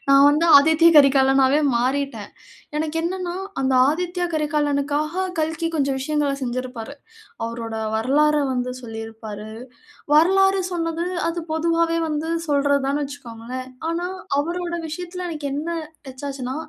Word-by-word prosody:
நான் 275 0 +7
வந்து 305 +3 +2
ஆதித்ய 320 +3 +5
கரிகாலனாவே 270 0 +5 0.2
மாறிட்டேன். 255 -3 -1 0.5
எனக்கு 310 +1 -2
என்னனென்னா, 360 0 -3 0.2
அந்த 265 -1 +1 0.2
ஆதித்யா 355 +2 -2
கரிகாலனுக்காக 300 +3 0
கல்கி 320 +1 -1
கொஞ்சம் 275 -2 0
விஷயங்கள 295 0 0
செஞ்சிருப்பாரு. 250 0 -4 0.5
அவரோட 230 -1 -5 0.2
வரலாற 290 +7 +3 0.2
வந்து 250 0 -2
சொல்லியிருப்பாரு. 225 -2 -8 0.6
வரலாறு 385 +4 +4
சொன்னது, 330 0 -2 0.2
அது 335 +1 -3
பொதுவாவே 330 +1 +1
வந்து 305 +1 -2 0.2
சொல்றது 285 -1 +2
தான்னு 285 +1 0
வச்சுக்கோங்களேன். 255 -2 -8 0.2
ஆனா, 345 +2 -2 0.3
அவரோட 345 +3 -3
விஷயத்தில 355 +2 -5
எனக்கு 305 -3 -5
என்ன 300 +4 -3 0.4
டச்சாச்சுன்னா 265 -1 -5
290 Hz, 115 wpm, -22 LUFS, 260-330 Hz, 0.6 s, நான்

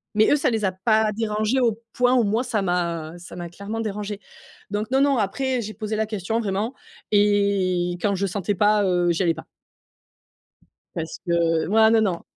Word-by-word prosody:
Mais 215 +1 +4
eux, - - +6
ça 285 - +1
les 220 -2 -1
a 190 - +1
pas 215 +3 +2
dérangés 215 +3 0
au 230 -3 +1
point 250 0 +3
où 245 - +4
moi, 220 +4 +1
ça 235 -5 -1
m'a 170 -3 -2
ça 175 +1 -11
m'a 175 -1 -6
clairement 200 +6 -6
dérangée. 210 -1 -4 0.5
Donc 210 +1 -2
non, 265 +1 +3
non, 280 -1 +3
après, 250 +5 -1
j'ai 215 -1 -6
posé 215 0 -4
la 220 0 0
question, 215 +1 -2
vraiment. 210 +2 -2 0.4
Et 200 -4 +2
quand 200 +1 +1
je 195 +1 -1
sentais 195 +2 -2
pas, 210 +1 +3
heu, 175 -2 +2
j'y 170 - -1
allais 170 -2 +2
pas. - - -10 1.5
Parce 160 -1 -5
que 165 -2 +1
voilà, 220 +3 +5
non, 225 0 +4
non. 170 - -7
205 Hz, 195 wpm, -23 LUFS, 180-220 Hz, 1.5 s, eux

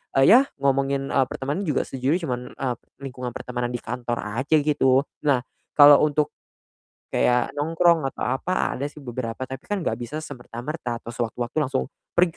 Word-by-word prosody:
eee, 135 - +5
ya 240 - +10 0.2
ngomongin, 135 0 0
eee, 135 - +3
pertemanan 145 +11 -3
juga 150 - +1
sejujurnya 135 +7 -1
cuman, 125 -4 -2
eee, 130 -2 -2 0.3
lingkungan 125 -2 -6
pertemanan 125 0 -3
di 120 - -4
kantor 120 0 -3 0.2
aja 145 +4 +2
gitu. 140 -3 +3 0.2
Nah 130 -4 +3 0.3
kalau 145 -1 +9
untuk 150 0 0 0.8
kayak 125 0 +2
nongkrong 165 0 +3
atau 135 - -5
apa 180 +8 0
ada 140 - -3
sih 145 0 -10
beberapa 120 -1 -5
tapi 130 0 -5
kan 205 -3 -2
gak - - -1
bisa 125 +6 -5
semerta-merta 125 -1 -5
atau 115 - -7
sewaktu-waktu 120 +1 -4
langsung, 130 - 0 0.2
"Pergi 175 0 +4
135 Hz, 165 wpm, -24 LUFS, 125-150 Hz, 0.8 s, ya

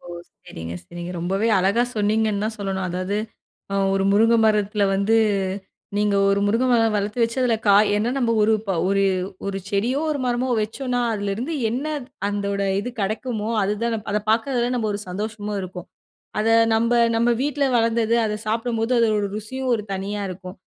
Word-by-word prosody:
ஓ! - - -16 0.4
சரிங்க, 80 +1 -7
சரிங்க. 175 - -7
ரொம்பவே 195 +6 0
அழகா 195 +6 +2
சொன்னிங்கன்னு 210 0 +1
தான் 220 0 -3
சொல்லணும். 190 -2 -2
அதாவது 185 +3 -2 0.6
அ - - -1 0.2
ஒரு 195 0 +1
முருங்க 225 +3 +4
மரத்தில 210 -1 +2
வந்து 200 +3 +2 0.8
நீங்க 205 0 +2
ஒரு 200 0 +2
முருங்கை 230 +5 +2
மரம் 225 -2 +3
வளர்த்து 205 +3 -2
வச்சதில 235 +1 +1
காய் 205 +1 +6
என்ன 225 +4 0
நம்ம 240 -3 +1
ஒரு 215 +1 +4
ப - - -2 0.2
ஒரு 195 0 +2 0.4
ஒரு 195 -1 -2
செடியோ, 230 +7 0
ஒரு 295 - -1
மரமோ 245 +1 0
வச்சோன்னா 245 +3 -2
அதிலருந்து 210 +8 -3 0.2
என்ன 250 +5 -2 0.4
அந்தோட 200 -1 -2 0.2
இது 245 - -5
கிடைக்குமோ 215 +2 -2
அதுதான் 215 +4 -1 0.2
அத 210 - +1
பார்க்கறதில 240 +2 +1
நம்ம 225 -3 -1
ஒரு 205 - -4
சந்தோஷமு 210 +2 -4
இருக்கும். 180 -1 -8 0.5
அத 220 - +1 0.3
நம்ப 230 +2 +2 0.2
நம்ப 235 +1 +3
வீட்ல 290 0 0
வளர்ந்தது 230 0 +2
அத 210 0 -2
சாப்பிடும்போது 225 +1 -1
அதோட 215 -3 +2
ருசியும் 255 +5 -4
ஒரு 215 -3 -3
தனியா 200 +2 -3
இருக்கும். 185 +1 -9
215 Hz, 160 wpm, -22 LUFS, 200-230 Hz, 0.8 s, காய்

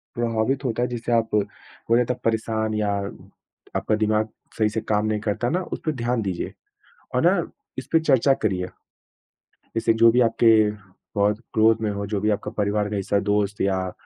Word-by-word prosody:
प्रभावित 120 +3 0
होता 120 -1 -1
है, - - +1
जिसे 120 0 -4
आप 115 -1 +2
बोलें, 115 +3 -1
तो 125 - 0
परेशान 110 -1 0
या 105 -1 0 0.9
आपका 110 - +1
दिमाग 110 0 +1 0.3
सही 110 -1 +3
से 110 +1 -3
काम 105 0 0
नहीं 110 -1 0
करता 110 +3 -1
ना, 180 +3 0
उसपे 160 - -3
ध्यान 120 -3 -1
दीजिए, 95 -4 -3 0.6
और - - +3
ना, - - +2 0.3
इसपे 165 - +1
चर्चा 135 -3 +4
करिए। 95 -7 -1 1.1
जैसे, 115 0 +2
जो 115 +1 +6
भी 125 +1 +3
आपके 115 0 +4 0.6
बहुत 105 +1 +2
क्लोज़ 110 +1 +4
में 105 - +1
हो, 100 0 -3
जो 105 -1 -1
भी 110 - +1
आपका 105 0 -1
परिवार 105 0 0
का 105 - -3
हिस्सा, 100 +1 0
दोस्त 105 0 0
या 95 -1 0
110 Hz, 175 wpm, -23 LUFS, 105-115 Hz, 1.1 s, जो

